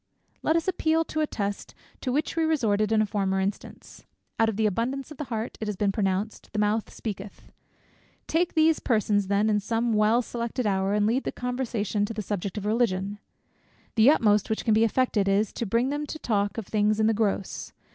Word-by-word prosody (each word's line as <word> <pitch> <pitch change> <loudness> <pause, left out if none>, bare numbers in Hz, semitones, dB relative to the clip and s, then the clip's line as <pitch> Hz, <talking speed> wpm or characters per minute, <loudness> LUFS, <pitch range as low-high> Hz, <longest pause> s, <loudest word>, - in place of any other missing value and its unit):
Let 315 - +2
us 335 +1 0
appeal 325 -3 +2
to 310 -1 -3
a 305 - +1
test 200 -5 -4 0.3
to 255 - -2
which 295 +4 -1
we 330 - +1
resorted 220 -10 +1
in 215 -1 +4
a - - 0
former 195 -2 0
instance. 195 +1 -5 0.4
"Out 225 0 +4
of 220 - -3
the 220 - +2
abundance 255 +8 -1
of 305 - -9
the 300 - -4
heart," 225 -2 -4
it 215 - -2
has 210 - -2
been 200 +1 +1
pronounced, 195 +1 -2
"the - - -3
mouth 210 +1 0
speaketh." 205 -2 -7 0.7
Take 340 +2 0
these 315 0 +4
persons 210 -4 +1
then 200 +2 +2
in 210 -1 +2
some 230 +3 0
well 215 +3 +3
selected 235 +1 -3
hour, 195 0 +1
and 210 0 +2
lead 240 +5 +1
the - - -2
conversation 240 -5 -2
to 225 +1 -6
the 215 - -3
subject 200 0 -3
of 205 - -4
Religion. 205 -3 0 0.7
The 225 +3 +6
utmost 210 -9 +3
which 220 - -2
can 220 - +3
be 220 +1 +4
effected 230 -3 +1
is, 200 +1 +1
to 230 - -3
bring 235 +6 +1
them 295 +1 -3
to 315 - -5
talk 205 -6 -1
of 225 - -4
things 210 +1 +1
in 220 - +3
the 225 - +3
gross. 205 -3 -2
220 Hz, 210 wpm, -26 LUFS, 205-245 Hz, 0.7 s, The